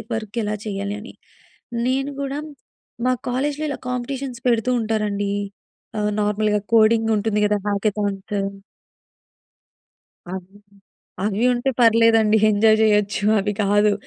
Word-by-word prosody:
Work 225 Hz, +1 st, -4 dB
ఎలా 210 Hz, 0 st, -2 dB
చేయాలి 200 Hz, 0 st, -3 dB
అని. 235 Hz, -, -11 dB, 0.7 s
నేను 270 Hz, +2 st, 0 dB
కూడా 280 Hz, +1 st, -3 dB, 0.7 s
మా 255 Hz, -, +3 dB, 0.2 s
కాలేజ్‌లో 285 Hz, +4 st, -1 dB
ఇలా 285 Hz, -, -4 dB
కాంపిటీషన్స్ 250 Hz, 0 st, -4 dB
పెడుతూ 235 Hz, +1 st, +1 dB
ఉంటారండి. 210 Hz, -2 st, -1 dB, 0.7 s
ఆహ్, 210 Hz, 0 st, 0 dB
నార్మల్‌గా 210 Hz, 0 st, +1 dB
కోడింగ్ 225 Hz, 0 st, +4 dB
ఉంటుంది 210 Hz, 0 st, 0 dB
కదా! 210 Hz, 0 st, +1 dB
హ్యాకథాన్స్. 205 Hz, -1 st, -2 dB, 1.9 s
అవి, 190 Hz, +2 st, -8 dB, 0.7 s
అవి 210 Hz, +2 st, 0 dB
ఉంటే 245 Hz, +2 st, 0 dB
పర్లేదండి. 225 Hz, -2 st, +5 dB
ఎంజాయ్ 215 Hz, +1 st, +4 dB
చేయొచ్చు. 210 Hz, -1 st, +2 dB, 0.2 s
అవి 205 Hz, +1 st, -1 dB
కాదు. 205 Hz, +1 st, +3 dB
215 Hz, 110 wpm, -21 LUFS, 205-235 Hz, 1.9 s, పర్లేదండి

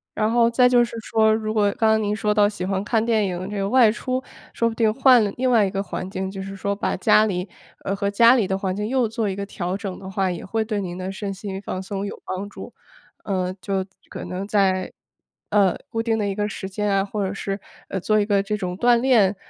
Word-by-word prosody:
然 215 Hz, 0 st, +1 dB
后 235 Hz, 0 st, +4 dB
再 250 Hz, +1 st, +4 dB
就 245 Hz, -1 st, +5 dB
是 235 Hz, -1 st, -5 dB
说， 220 Hz, 0 st, +3 dB
如 215 Hz, 0 st, -1 dB
果 205 Hz, -2 st, +2 dB
刚 220 Hz, -, +3 dB
刚 220 Hz, 0 st, +3 dB
您 205 Hz, 0 st, 0 dB
说 210 Hz, 0 st, 0 dB
到 210 Hz, -1 st, +4 dB
喜 205 Hz, -3 st, -5 dB
欢 190 Hz, 0 st, -1 dB
看 220 Hz, +1 st, +1 dB
电 220 Hz, -3 st, +2 dB
影 185 Hz, +1 st, -4 dB
这 210 Hz, -, -4 dB
个 195 Hz, 0 st, -1 dB
外 245 Hz, -1 st, +6 dB
出， 255 Hz, +3 st, -2 dB, 0.3 s
说 230 Hz, -, +1 dB
不 225 Hz, -, -3 dB
定 220 Hz, -2 st, +2 dB
换 255 Hz, -2 st, +6 dB
了 205 Hz, -, -1 dB
另 255 Hz, 0 st, +1 dB
外 225 Hz, -4 st, +4 dB
一 -, -, -1 dB
个 195 Hz, -, -1 dB
环 185 Hz, -1 st, -5 dB
境， 190 Hz, 0 st, -3 dB
就 195 Hz, 0 st, -6 dB
是 195 Hz, 0 st, -7 dB
说 200 Hz, +1 st, -1 dB
把 200 Hz, -, -1 dB
家 215 Hz, -, +5 dB
里， 180 Hz, -2 st, -2 dB, 0.4 s
呃 195 Hz, -, 0 dB
和 200 Hz, 0 st, -1 dB
家 235 Hz, +4 st, +6 dB
里 230 Hz, -6 st, +2 dB
的 190 Hz, 0 st, 0 dB
环 190 Hz, -1 st, -2 dB
境 210 Hz, +1 st, -2 dB
又 255 Hz, -1 st, +1 dB
做 220 Hz, -1 st, -2 dB
一 190 Hz, -, -3 dB
个 200 Hz, 0 st, -4 dB
调 185 Hz, -2 st, -3 dB
整 195 Hz, -2 st, -5 dB
的 190 Hz, -, -9 dB
话， 195 Hz, -1 st, 0 dB
也 175 Hz, -2 st, -5 dB
会 220 Hz, +3 st, -1 dB
对 210 Hz, -2 st, -2 dB
您 180 Hz, -2 st, -5 dB
的 185 Hz, 0 st, -4 dB
身 195 Hz, 0 st, -4 dB
心 195 Hz, 0 st, -6 dB
放 185 Hz, -2 st, -4 dB
松 195 Hz, +1 st, -4 dB
有 200 Hz, -, -7 dB
帮 195 Hz, +2 st, -4 dB
助。 -, -, -10 dB, 0.5 s
呃， 185 Hz, -2 st, -1 dB
就 195 Hz, -1 st, -1 dB, 0.2 s
可 -, -, -7 dB
能 185 Hz, +2 st, -4 dB
在， 190 Hz, -3 st, +1 dB, 0.6 s
呃， 200 Hz, -3 st, +3 dB
固 225 Hz, -, -2 dB
定 225 Hz, -1 st, 0 dB
的 210 Hz, -2 st, -1 dB
一 200 Hz, -, -1 dB
个 210 Hz, +1 st, -1 dB
时 190 Hz, -, -6 dB
间 210 Hz, +2 st, -2 dB
啊， 195 Hz, 0 st, +2 dB
或 205 Hz, 0 st, -2 dB
者 190 Hz, -, -3 dB
是， 195 Hz, 0 st, -4 dB, 0.3 s
呃， 190 Hz, -, -2 dB
做 215 Hz, +4 st, +2 dB
一 205 Hz, -, +2 dB
个 200 Hz, -2 st, +2 dB
这 210 Hz, +2 st, -2 dB
种 180 Hz, -3 st, -4 dB
锻 240 Hz, +3 st, +4 dB
炼， 230 Hz, -6 st, +3 dB
205 Hz, 280 characters per minute, -23 LUFS, 195-220 Hz, 0.6 s, 外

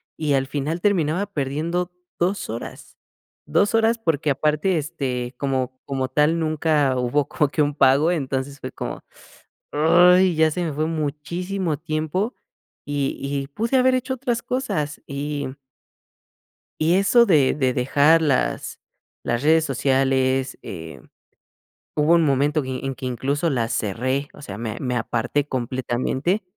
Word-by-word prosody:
y 150 Hz, -3 st, 0 dB
al 135 Hz, -1 st, +1 dB
final 150 Hz, +5 st, -3 dB
terminaba 185 Hz, -2 st, +1 dB
perdiendo 170 Hz, +1 st, -2 dB, 0.3 s
2 185 Hz, +1 st, 0 dB
horas, 115 Hz, -, -8 dB, 0.5 s
2 205 Hz, +2 st, +2 dB
horas, 225 Hz, +1 st, +3 dB
porque 155 Hz, -8 st, 0 dB
aparte, 155 Hz, +6 st, +1 dB
este, 135 Hz, -5 st, -3 dB
como 130 Hz, -2 st, -2 dB
como 135 Hz, -2 st, -2 dB
tal 150 Hz, +5 st, +2 dB
nunca 155 Hz, -4 st, +1 dB
hubo 130 Hz, +4 st, +1 dB
como 150 Hz, -, +1 dB
que 150 Hz, -, 0 dB
un 145 Hz, 0 st, +1 dB
pago, 140 Hz, +4 st, +4 dB
entonces 140 Hz, -3 st, -2 dB
fue 130 Hz, -, -6 dB
como: -, -, -6 dB, 0.7 s
"Ay, 180 Hz, +4 st, +5 dB
ya 160 Hz, 0 st, +4 dB
se 175 Hz, +3 st, -2 dB
me 160 Hz, -, -2 dB
fue 155 Hz, +2 st, -1 dB
muchísimo 165 Hz, +3 st, -2 dB
tiempo", 160 Hz, -, -2 dB, 0.5 s
y 145 Hz, -1 st, -2 dB
y 140 Hz, 0 st, -3 dB
pude 230 Hz, -, -1 dB
haber 255 Hz, 0 st, +4 dB
hecho 255 Hz, +1 st, -1 dB
otras 240 Hz, -2 st, -2 dB
cosas, 155 Hz, -, -2 dB
y 145 Hz, 0 st, -3 dB, 1.3 s
y 160 Hz, +3 st, +3 dB
eso 235 Hz, +5 st, +5 dB
de 150 Hz, -, +4 dB
de 130 Hz, -3 st, +1 dB
dejar 145 Hz, +6 st, +4 dB
las 140 Hz, -5 st, 0 dB, 0.4 s
las 120 Hz, 0 st, -1 dB
redes 160 Hz, +1 st, +4 dB
sociales, 135 Hz, -1 st, +1 dB
eh, 80 Hz, -6 st, -8 dB, 0.9 s
hubo 150 Hz, +2 st, +4 dB
un 165 Hz, -1 st, +4 dB
momento 145 Hz, +2 st, +2 dB
que 130 Hz, -1 st, -4 dB
en 135 Hz, -1 st, -2 dB
que, 130 Hz, -, -6 dB
incluso, 140 Hz, +6 st, -1 dB
las 120 Hz, -4 st, -1 dB
cerré. 130 Hz, +7 st, -1 dB
O -, -, -14 dB
sea, 100 Hz, -7 st, -7 dB
me 115 Hz, -2 st, -4 dB
me 125 Hz, -2 st, -2 dB
aparté 120 Hz, +5 st, -1 dB
completamente, 130 Hz, -, -1 dB
145 Hz, 145 wpm, -22 LUFS, 130-170 Hz, 1.3 s, Ay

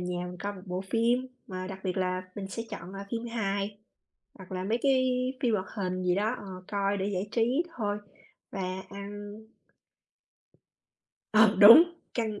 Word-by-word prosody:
nhà 180 Hz, 0 st, -3 dB
mình 180 Hz, -, -7 dB
coi 205 Hz, 0 st, -3 dB
một 185 Hz, -2 st, -11 dB
bộ 180 Hz, +1 st, -3 dB
phim, 235 Hz, +6 st, +1 dB, 0.2 s
mà 185 Hz, -1 st, -5 dB
đặc 190 Hz, 0 st, -6 dB
biệt 185 Hz, 0 st, -1 dB
là 185 Hz, 0 st, 0 dB
mình 195 Hz, -2 st, -5 dB
sẽ 230 Hz, +4 st, -4 dB
chọn, 180 Hz, +3 st, -7 dB
à, 200 Hz, 0 st, -7 dB
phim 235 Hz, 0 st, -3 dB
hài 200 Hz, -3 st, -2 dB, 0.6 s
hoặc 190 Hz, -1 st, -12 dB
là 185 Hz, 0 st, -3 dB
mấy 225 Hz, +4 st, 0 dB
cái 265 Hz, -2 st, +4 dB, 0.4 s
phim 235 Hz, -3 st, +3 dB
hoạt 190 Hz, -2 st, -1 dB
hình 185 Hz, -2 st, -2 dB
gì 180 Hz, -1 st, +2 dB
đó, 215 Hz, +5 st, +1 dB
ờ, -, -, -10 dB, 0.2 s
coi 200 Hz, 0 st, 0 dB
để 195 Hz, 0 st, -1 dB
giải 195 Hz, +1 st, -2 dB
trí 245 Hz, +8 st, +2 dB, 0.2 s
thôi, 205 Hz, -1 st, -1 dB, 0.5 s
và 195 Hz, -, -4 dB, 0.3 s
ăn 205 Hz, +1 st, -8 dB, 2.0 s
Ờ, 215 Hz, -1 st, +6 dB
đúng! 225 Hz, +10 st, +11 dB, 0.3 s
Căng 220 Hz, -3 st, -2 dB
200 Hz, 175 wpm, -29 LUFS, 185-220 Hz, 2.0 s, đúng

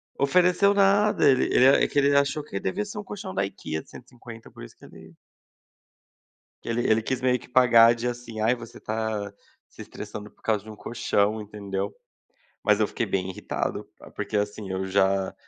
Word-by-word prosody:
Ofereceu 180 Hz, +7 st, +3 dB
nada, 200 Hz, +1 st, +3 dB
ele 130 Hz, -, +3 dB
ele 130 Hz, -, +4 dB
é 135 Hz, -, +5 dB
que -, -, -6 dB
ele 140 Hz, 0 st, +3 dB
achou 140 Hz, +2 st, +2 dB
que 100 Hz, -, -5 dB
devia 95 Hz, -, -2 dB
ser 205 Hz, 0 st, -9 dB
um 205 Hz, -, -4 dB
colchão 200 Hz, -, -7 dB
da 100 Hz, +1 st, 0 dB
IKEA 80 Hz, -5 st, -5 dB
de -, -, -24 dB
150 115 Hz, -2 st, -13 dB
por -, -, -12 dB
isso -, -, -12 dB
que -, -, -16 dB
ele 80 Hz, 0 st, -15 dB, 1.5 s
que -, -, -8 dB
ele 120 Hz, +1 st, 0 dB
ele 110 Hz, 0 st, +3 dB
quis 130 Hz, +3 st, -3 dB
meio 125 Hz, 0 st, +2 dB
que -, -, -15 dB
pagar 120 Hz, -2 st, +6 dB
de 115 Hz, +1 st, -4 dB
assim: 120 Hz, -2 st, -6 dB
“Ai, 115 Hz, +3 st, +3 dB
você 115 Hz, -2 st, -11 dB
está 110 Hz, -2 st, -3 dB, 0.4 s
se -, -, -13 dB
estressando 105 Hz, -1 st, -9 dB
por -, -, -32 dB
causa 105 Hz, -3 st, 0 dB
de 110 Hz, -, -12 dB
um 110 Hz, -, -9 dB
colchão”, 110 Hz, -2 st, -1 dB
entendeu. 100 Hz, -1 st, -5 dB, 0.7 s
Mas -, -, +3 dB
eu -, -, +2 dB
fiquei -, -, -3 dB
bem 95 Hz, -1 st, -2 dB
irritado, 95 Hz, -, -4 dB, 0.3 s
porque 105 Hz, +1 st, -3 dB
assim 105 Hz, -1 st, -3 dB
eu 95 Hz, 0 st, -2 dB
já 95 Hz, 0 st, +1 dB
110 Hz, 195 wpm, -25 LUFS, 100-130 Hz, 1.5 s, pagar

